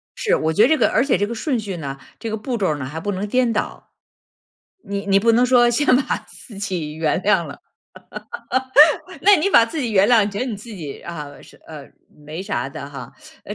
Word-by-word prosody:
是， 455 - +1
我 160 0 -1
觉 210 - +2
得 240 - +6
这 315 - +3
个 - - +3
而 - - +2
且 275 - +1
这 205 - 0
个 235 - -5
顺 250 +1 -2
序 200 -4 -5
呢， 140 -4 -6 0.2
这 225 - -5
个 220 - -3
步 240 +3 -4
骤 195 - 0
儿 150 - -1
呢 140 - -5
还 155 +4 -6
不 205 +5 -3
能 195 +2 -3
颠 250 +2 +1
倒， 220 - -4 0.9
你 200 0 -5
你 195 0 +3
不 230 +2 +3
能 245 +2 +3
说 240 -1 +4
先 290 +5 0
把 265 - 0
自 215 -6 -14
己 175 -7 -4
原 160 +1 0
谅 195 -4 +2
了， - - -10 1.6
那 400 +1 +7
你 365 +6 0
把 230 -11 +6
自 305 +6 -5
己 240 - -2
原 200 +2 +4
谅， 225 -4 +5
你 205 - -3
觉 200 - -6
得 255 - -1
你 220 -5 -4
自 225 +3 -12
己 160 -9 -8
啊， 170 -4 -7 0.4
呃， 150 -4 -11 0.3
没 155 +5 -8
啥 130 -7 -3
的 140 0 -8
哈， 135 -4 -9 0.3
呃， - - -6
205 Hz, 250 characters per minute, -20 LUFS, 160-240 Hz, 1.6 s, 那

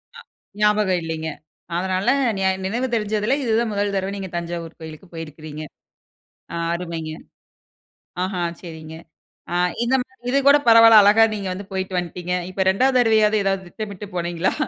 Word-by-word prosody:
அ - - -10 0.4
ஞாபகம் 210 -4 +2
இல்லைங்க, 160 -1 -4 0.5
அதனால 190 +4 0 0.3
நியா 190 0 +2 0.2
நினைவு 240 +6 -1
தெரிஞ்சதில 215 +4 0
இதுதான் 225 -1 +1
மொதல் 200 0 -1
தரவ 190 +1 -1
நீங்க 190 -2 -6
தஞ்சாவூர் 170 -1 -5
கோயிலுக்கு 160 +3 -10
போயிருக்கிறீங்க. 155 -1 -8 0.9
அ - - -3 0.2
அருமைங்க! 165 -3 -5 1.1
ஆஹா 185 -1 -2 0.2
சரிங்க. 160 -2 -9 0.6
அ - - 0 0.3
இந்த 260 +3 +2
மாரி 250 -2 -15
இது 275 - +3
கூட 285 +1 +8
பரவாயில்ல, 225 -1 +9
அழகா 215 +2 +6
நீங்க 200 -2 -4
வந்து 195 +1 -8
போயிட்டு 190 -1 -2
வன்ட்டீங்க. 175 +1 -4 0.2
இப்போ 190 +1 0
2வது 255 +5 +2
தரவையாவது, 215 -2 +3
ஏதாவது 195 -1 -1
திட்டமிட்டு 205 0 -7
போனீங்களா? 175 +1 -1
190 Hz, 145 wpm, -22 LUFS, 170-215 Hz, 1.1 s, பரவாயில்ல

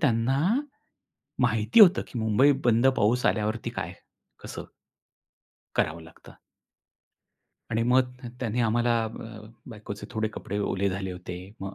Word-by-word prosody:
त्यांना 130 -1 +2 1.0
माहिती 115 - +3
होतं, 195 -3 +8
की 120 - -5
मुंबई 110 +6 +4
बंद 120 +2 +4
पाऊस 120 +5 +2
आल्यावरती 110 +1 0
काय? - - -5 0.5
कसं? - - -7 1.2
करावं 80 +2 0
लागतं. 80 - -16 1.3
आणि 115 0 +1
मग 125 +1 +3
त - - -7
त्यांनी 120 -1 -1
आम्हाला 120 +1 +2
अ, 110 0 -8 0.3
बायकोचे 105 -2 -8
थोडे 110 0 -1
कपडे 100 0 -5
ओले 100 -1 0
झाले 95 0 -4
होते. 90 0 -7 0.2
मग 95 0 -6
110 Hz, 130 wpm, -27 LUFS, 105-120 Hz, 1.3 s, होतं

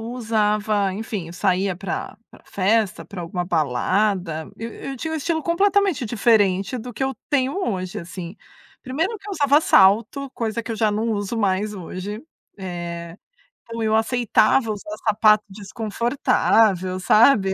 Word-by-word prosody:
usava, 215 -3 0
enfim, 205 -3 -5
eu - - -9
saía 185 0 0
pra 190 -1 -5
pra - - -18
festa, 205 +1 0
pra 195 -3 -8
alguma 175 +1 -3
balada, 170 - 0
eu 230 +1 -6
eu 270 - -7
tinha 320 +5 -4
estilo 320 +1 -1
completamente 390 -3 +2
diferente 210 -2 +2
do 245 +2 -7
que 215 - -5
eu 265 0 -2 0.2
tenho 275 +1 +1
hoje, 185 -4 -3
assim. 175 +2 -8 0.5
Primeiro 300 - -2
que 395 - -13
eu - - -4
usava 285 -4 +4
salto, 230 +5 +3
coisa 230 -1 -3
que 230 - -8
eu - - -5
já 215 -1 +2
não 220 +2 -1
uso 205 +1 -2
mais 205 0 0
hoje, 195 +3 -6 0.4
eh, 170 -2 -6 0.5
então 230 0 -7
eu 220 0 +2
aceitava 225 0 +2
usar 210 0 -6
sapato 215 0 +4
desconfortável, 205 -2 +1
sabe. 200 +1 +4
215 Hz, 145 wpm, -22 LUFS, 190-235 Hz, 0.5 s, usava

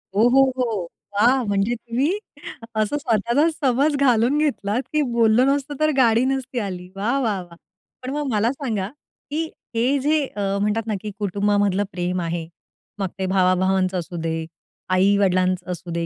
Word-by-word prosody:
हो, 220 +3 +5
हो, 270 +2 +5 0.2
हो, 220 -8 -1 0.3
वाह! 245 +5 +4
म्हणजे 200 +3 +1
तुम्ही 255 - -1 0.6
असं 215 +6 0
स्वतःला 240 +3 +2
समज 285 0 +1
घालून 250 +1 +3
घेतलात, 250 -6 0
की 305 - +3
बोललं 235 +2 +4
नसतं 285 +1 0
तर 310 0 +3
गाडी 235 -2 +4
नसती 265 -2 -2
आली. 180 -3 -5
वाह! 235 +8 0
वाह! 210 -6 0
वाह! 170 -1 -15 0.5
पण 255 - -4
मग 295 -1 -2
मला 220 +3 +2
सांगा; 225 -9 -3 0.4
की 320 +2 0 0.3
हे 250 +5 +2
जे 300 +3 +2 0.2
अ, 205 - -3 0.2
म्हणतात 210 +2 0
ना 220 - -1
की 210 - -5
कुटुंबामधलं 205 0 +1
प्रेम 180 0 -2
आहे, 165 -1 -3 0.5
मग 195 - 0
ते 190 - 0
भावा-भावांच 185 0 +2
असू 175 0 -4
दे, 160 0 -2 0.4
आई-वडिलांचं 185 -1 +2
असू 175 -1 -6
दे 170 0 -2
215 Hz, 160 wpm, -22 LUFS, 190-260 Hz, 0.6 s, हो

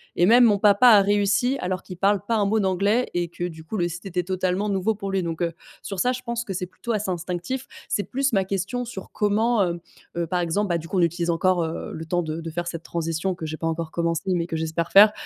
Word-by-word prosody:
et 175 - +4
même 240 +5 +7
mon 210 -3 +5
papa 205 +4 +5
a 210 -3 +8
réussi 205 +6 +2
alors 185 0 -2
qu'il 180 - -9
parle 200 +2 +2
pas 230 - +1
un 205 - +2
mot 215 +2 +2
d'anglais 200 +5 +2
et 175 0 0
que, 175 +1 -7
du 160 -2 -10
coup, 195 +7 -5
le 175 -2 +1
site 175 +3 -7
était 180 -1 -1
totalement 185 +2 -1
nouveau 200 +2 0
pour 195 -1 -5
lui, 195 - +1
donc 165 -1 -4
heu, 170 - -1 0.3
sur 195 -2 -5
ça, 250 - +3
je 255 - -5
pense 235 -1 -3
que 195 - -4
c'est 180 0 -3
plutôt 185 +6 -6
assez 205 -3 -1
instinctif. 180 +9 -4 0.2
C'est 205 - 0
plus, 270 0 -1
ma 195 -2 +3
question, 195 +6 -2
sur 200 -5 -8
comment, 215 +2 +2
heu 175 -1 -2 0.4
heu, 170 - 0
par 180 +2 -1
exemple, 175 +4 0
bah, 170 -1 +1
du 165 - -9
coup, 190 - -2
on - - +4
utilise 170 0 0
encore 175 +1 +2
le 160 0 -6
temps 175 +2 0
de 160 +1 -4
de 165 - -5
faire 175 +2 -3
cette 165 -1 -5
transition 165 +2 -2
que 165 - -6
j'ai 155 - -5
pas 165 - -2
encore 165 0 -3
commencée 170 +2 -1
mais 170 -1 -1
que 165 - -4
j'espère 160 +1 -2
faire, 210 +2 +9
185 Hz, 265 wpm, -24 LUFS, 170-205 Hz, 0.4 s, faire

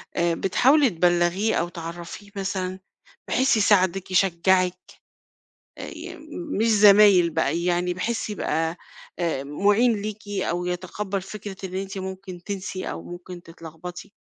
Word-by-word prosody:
آآ 170 0 +2
بتحاولي 265 - +4
تبلّغيه 175 +3 +2
أو 170 - 0
تعرّفيه 170 +4 -8
مثلًا 190 -1 -3 0.5
بحيث 260 -2 +3
يساعدِك، 195 -3 +2
يشجّعِك 185 0 +3 1.0
آآ - - -6
يم - - -9
م 320 - -5
مش 225 - +2
زمايل 205 -4 +7
بقى 160 +2 0
يعني 180 0 +1
بحيث 220 +4 -2
يبقى 165 -4 -1 0.4
آآ 165 -6 -1
مُعين 205 - +3
ليكِ 210 0 -6
أو 180 -3 -2
يتقبّل 190 +2 -3
فكرة 200 0 -8
إن 185 -1 -6
أنتِ 195 0 -4
ممكن 190 -1 -7
تنسي 195 -2 -4
أو - - -6
ممكن 175 0 -9
تتلغبطي؟ 165 +3 -10
185 Hz, 130 wpm, -24 LUFS, 175-205 Hz, 1.0 s, زمايل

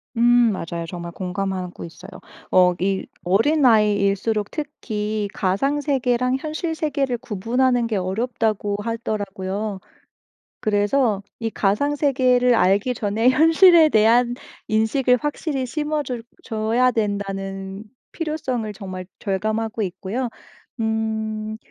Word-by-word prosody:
음 230 - -1 0.4
맞아요 170 0 -5
정말 170 0 -6
공감하고 185 0 -4
있어요. 165 +4 -12 0.4
어 180 -1 +5
이 190 +1 0 0.2
어린아이일수록 210 - +2
특히 215 -8 -3
가상 270 +11 0
세계랑 255 -2 +1
현실 320 +3 -3
세계를 280 -5 -1
구분하는 240 +4 0
게 220 - -2
어렵다고 205 +1 -1
하더라고요. 205 -3 -3 0.8
그래서 205 +1 +1 0.2
이 225 -1 -2
가상 220 +10 0
세계를 255 -3 +3
알기 205 +3 +3
전에 220 +2 +2
현실에 325 +4 +6
대한 235 +1 +4 0.3
인식을 245 +4 +2
확실히 295 -2 -2
심어줄 295 -3 -3 0.2
줘야 225 +2 +1
된다는 195 -2 -3 0.3
필요성을 270 -9 -3
정말 185 -2 -7
절감하고 215 +3 -2
있고요. 200 +6 -3 0.5
음 220 -1 -2
220 Hz, 260 characters per minute, -22 LUFS, 200-255 Hz, 0.8 s, 현실에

